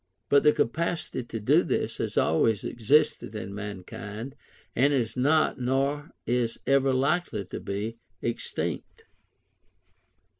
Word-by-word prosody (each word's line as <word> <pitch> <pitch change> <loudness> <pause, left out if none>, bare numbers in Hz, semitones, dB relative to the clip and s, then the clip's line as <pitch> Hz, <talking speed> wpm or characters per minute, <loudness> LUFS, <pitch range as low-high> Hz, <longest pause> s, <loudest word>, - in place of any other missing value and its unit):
But 140 - +6
the 150 - +6
capacity 160 0 -1
to 115 - -5
do 105 - +4
this - - -1
has - - -3
always 105 +6 +3
existed 120 -1 +2
in 100 -2 -5
mankind, 105 +4 -6 0.4
and 140 +4 +4
is 120 -5 0
not, 145 +3 +3
nor 135 +4 0 0.2
is 120 -1 0
ever 135 0 +3
likely 130 - 0
to - - -6
be, 105 +4 -4 0.2
extinct. 115 +3 -4
125 Hz, 120 wpm, -27 LUFS, 110-140 Hz, 0.4 s, But